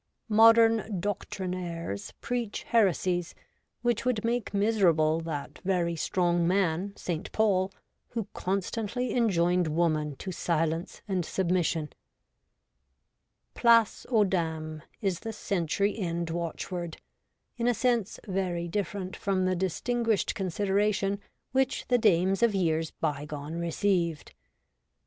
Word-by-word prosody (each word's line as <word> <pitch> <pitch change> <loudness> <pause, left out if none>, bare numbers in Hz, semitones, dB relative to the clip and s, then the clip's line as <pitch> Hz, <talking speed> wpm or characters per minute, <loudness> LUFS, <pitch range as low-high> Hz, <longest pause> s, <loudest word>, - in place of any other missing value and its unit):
Modern 225 -2 +5
doctrinaires 180 - -4
preach 240 -4 -3
heresies 185 -5 +1 0.5
which 240 -2 +1
would 235 -3 0
make 235 -1 -1
miserable 185 -7 +3
that 155 -4 -5
very 180 -3 0
strong 175 +1 +1
man, 185 +1 +1
St. 175 +1 -4
Paul, 195 -3 +2 0.4
who 230 -4 -4
constantly 210 +6 -2
enjoined 180 -6 +2
woman 155 -2 0
to 185 - -6
silence 165 +1 -1
and 190 -3 0
submission. 170 -4 0 1.6
Place 230 -2 +4
aux 225 -4 +4
dames 160 -4 -2 0.2
is 190 -4 0
the 225 - -5
century 200 +1 0
end 170 -3 -2
watchword, 170 0 -4 0.6
in 235 0 0
a 245 - +3
sense 235 -3 0
very 180 -3 -1
different 190 0 -3
from 190 -2 0
the 185 0 +1
distinguished 225 +5 0
consideration 200 +1 0 0.3
which 265 0 0
the 245 -1 +4
dames 190 -2 +3
of 230 -3 +3
years 165 -4 +1
bygone 150 0 -4
received. 170 - 0
185 Hz, 110 wpm, -28 LUFS, 170-210 Hz, 1.6 s, Modern